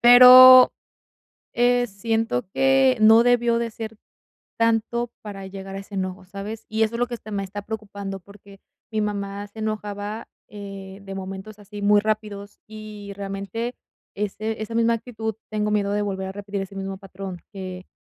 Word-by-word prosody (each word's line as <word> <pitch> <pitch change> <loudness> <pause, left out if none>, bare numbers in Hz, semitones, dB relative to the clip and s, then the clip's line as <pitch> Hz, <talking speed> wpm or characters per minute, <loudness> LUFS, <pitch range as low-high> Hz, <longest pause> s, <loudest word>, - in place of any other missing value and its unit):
pero, 255 +1 +10 0.8
eh, 245 0 +3
siento 225 - -1
que 270 -1 +4
no 225 +2 +7
debió 240 -1 +3
de 235 -1 -3
ser 220 -1 -7 0.6
tanto 230 +1 +1
para 195 -2 -8
llegar 195 0 -8
a - - -4
ese 195 +1 -10
enojo, 185 0 -4
¿sabes? 200 +3 -7
Y 220 +1 0
eso 220 +1 +1
es - - -7
lo 245 - +2
que 245 - -6
está 220 -2 -10
me 200 -1 -2
está 205 +2 -7
preocupando, 200 -2 -6
porque 200 +1 -17 0.3
mi 220 -1 -1
mamá 200 -1 -3
se 220 +2 -11
enojaba, 210 0 -4 0.2
eh, 195 -1 -9
de 195 - -7
momentos 195 +2 -7
así 205 0 -10
muy 205 0 +5
rápidos, 210 -1 -4
y 215 -2 -9
realmente 200 +4 -5 0.4
ese 215 +2 -3
esa 225 +1 -6
misma 230 0 +3
actitud 220 -1 -5 0.2
tengo 210 0 -1
miedo 205 -1 0
de 205 - 0
volver 190 -2 -3
a - - -6
repetir 200 0 -5
ese 195 +1 -9
mismo 195 0 -5
patrón, 190 -2 -8
que 185 -1 -7
210 Hz, 170 wpm, -23 LUFS, 195-225 Hz, 0.8 s, pero